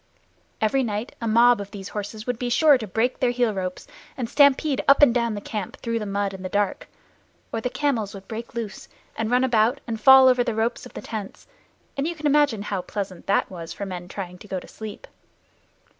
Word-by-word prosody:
Every 220 Hz, +5 st, +2 dB
night 215 Hz, -1 st, -3 dB
a 230 Hz, -, -2 dB
mob 235 Hz, 0 st, +5 dB
of 200 Hz, -, -8 dB
these 200 Hz, -1 st, -8 dB
horses 215 Hz, +1 st, -6 dB
would 245 Hz, -2 st, -3 dB
be 245 Hz, -, -2 dB
sure 295 Hz, +4 st, +5 dB
to 230 Hz, -4 st, -3 dB
break 225 Hz, +6 st, 0 dB
their 255 Hz, -3 st, +2 dB
heel 240 Hz, -2 st, +1 dB
ropes 185 Hz, -2 st, -4 dB, 0.3 s
and 245 Hz, -3 st, -2 dB
stampede 280 Hz, +2 st, +3 dB
up 280 Hz, +1 st, +6 dB
and 240 Hz, -, +7 dB
down 235 Hz, -2 st, 0 dB
the 205 Hz, -, -5 dB
camp 205 Hz, -3 st, -5 dB
through 230 Hz, -1 st, -2 dB
the 210 Hz, -, -5 dB
mud 200 Hz, 0 st, -1 dB
in 190 Hz, -, -8 dB
the 185 Hz, -, -5 dB
dark, 205 Hz, -1 st, -1 dB, 0.7 s
or 225 Hz, -, -1 dB
the 250 Hz, -, -1 dB
camels 240 Hz, -8 st, -1 dB
would 195 Hz, -1 st, -11 dB
break 230 Hz, +1 st, -7 dB
loose 220 Hz, -4 st, -5 dB, 0.3 s
and 225 Hz, -1 st, -2 dB
run 250 Hz, +1 st, +3 dB
about 240 Hz, +1 st, +2 dB
and 225 Hz, -2 st, -5 dB
fall 265 Hz, +2 st, +8 dB
over 250 Hz, -1 st, +4 dB
the 235 Hz, -, -2 dB
ropes 225 Hz, +2 st, -1 dB
of -, -, -20 dB
the -, -, -6 dB
tents, 215 Hz, -3 st, -7 dB, 0.5 s
and 275 Hz, +2 st, -1 dB
you 340 Hz, -, -3 dB
can 310 Hz, -1 st, -8 dB
imagine 285 Hz, -8 st, +3 dB
how 200 Hz, -3 st, -2 dB
pleasant 190 Hz, -1 st, -6 dB
that 195 Hz, -, +1 dB
was 170 Hz, -3 st, -7 dB
for 200 Hz, -, -5 dB
men 180 Hz, -2 st, -6 dB
trying 180 Hz, -1 st, -7 dB
to 210 Hz, -, -13 dB
go 190 Hz, -2 st, -3 dB
to -, -, -14 dB
sleep. 215 Hz, -2 st, -9 dB
225 Hz, 225 wpm, -24 LUFS, 200-250 Hz, 0.7 s, fall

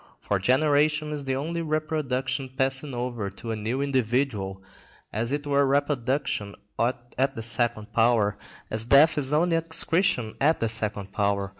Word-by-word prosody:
For 100 Hz, -, -1 dB
generation 150 Hz, -, +2 dB
is 145 Hz, -3 st, -4 dB
only 155 Hz, +6 st, -2 dB
reproduction 140 Hz, -4 st, -2 dB
passing 135 Hz, +1 st, -1 dB
over 120 Hz, -4 st, -3 dB
to 115 Hz, +3 st, -7 dB
a -, -, -1 dB
new 115 Hz, +6 st, -2 dB
individual, 120 Hz, -7 st, -1 dB, 0.5 s
as 115 Hz, +4 st, -2 dB
it 145 Hz, 0 st, -2 dB
were 140 Hz, -1 st, +2 dB
reproduction 135 Hz, -6 st, 0 dB, 0.2 s
at 125 Hz, +3 st, -1 dB
the 115 Hz, -, -5 dB
second 115 Hz, -2 st, -1 dB
power, 115 Hz, -2 st, +3 dB, 0.4 s
as 110 Hz, 0 st, -1 dB
death 140 Hz, +6 st, +6 dB
is 135 Hz, -1 st, +1 dB
only 165 Hz, +2 st, +3 dB
excretion 165 Hz, -, +1 dB
at 155 Hz, +4 st, +3 dB
the 115 Hz, -, 0 dB
second 105 Hz, -3 st, -2 dB
power. 100 Hz, -1 st, 0 dB
130 Hz, 145 wpm, -26 LUFS, 110-145 Hz, 0.5 s, death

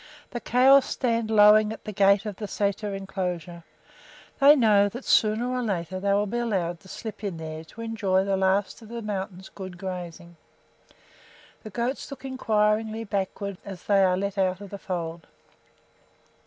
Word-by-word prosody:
The 240 Hz, -, -4 dB
cows 260 Hz, +3 st, +5 dB
stand 230 Hz, -3 st, -1 dB
lowing 210 Hz, 0 st, +6 dB
at 220 Hz, -, -8 dB
the 215 Hz, -, -4 dB
gate 200 Hz, 0 st, +3 dB
of 205 Hz, -3 st, -5 dB
the 210 Hz, -, -5 dB
sæter 200 Hz, 0 st, -2 dB
inclosure; 180 Hz, -3 st, -5 dB, 0.8 s
they 285 Hz, +2 st, +8 dB
know 210 Hz, -6 st, +4 dB
that 245 Hz, +6 st, -9 dB
sooner 220 Hz, +3 st, +3 dB
or 255 Hz, 0 st, -1 dB
later 185 Hz, -5 st, -3 dB
they 200 Hz, +1 st, 0 dB
will 205 Hz, +1 st, +2 dB
be 235 Hz, +4 st, -2 dB
allowed 185 Hz, -8 st, -1 dB
to 190 Hz, -, -18 dB
slip 215 Hz, +2 st, -8 dB
in 195 Hz, -5 st, -3 dB
there 160 Hz, 0 st, -6 dB
to 220 Hz, +8 st, -12 dB
enjoy 205 Hz, -5 st, 0 dB
the 195 Hz, 0 st, 0 dB
last 190 Hz, +3 st, 0 dB
of 220 Hz, -, -13 dB
the 235 Hz, -1 st, -6 dB
mountain's 190 Hz, -2 st, -5 dB
good 185 Hz, -3 st, -9 dB
grazing. 175 Hz, -2 st, -7 dB, 1.2 s
The 215 Hz, -, -9 dB
goats 240 Hz, +9 st, -3 dB
look 275 Hz, -1 st, -9 dB
inquiringly 220 Hz, -3 st, 0 dB
backward 200 Hz, -1 st, -3 dB
as 195 Hz, -3 st, -9 dB
they 200 Hz, -1 st, +3 dB
are 185 Hz, -1 st, +3 dB
let 200 Hz, +1 st, -3 dB
out 185 Hz, -1 st, +1 dB
of 200 Hz, -2 st, -10 dB
the 200 Hz, -, -7 dB
fold. 170 Hz, -3 st, -5 dB
200 Hz, 170 wpm, -26 LUFS, 185-220 Hz, 1.2 s, they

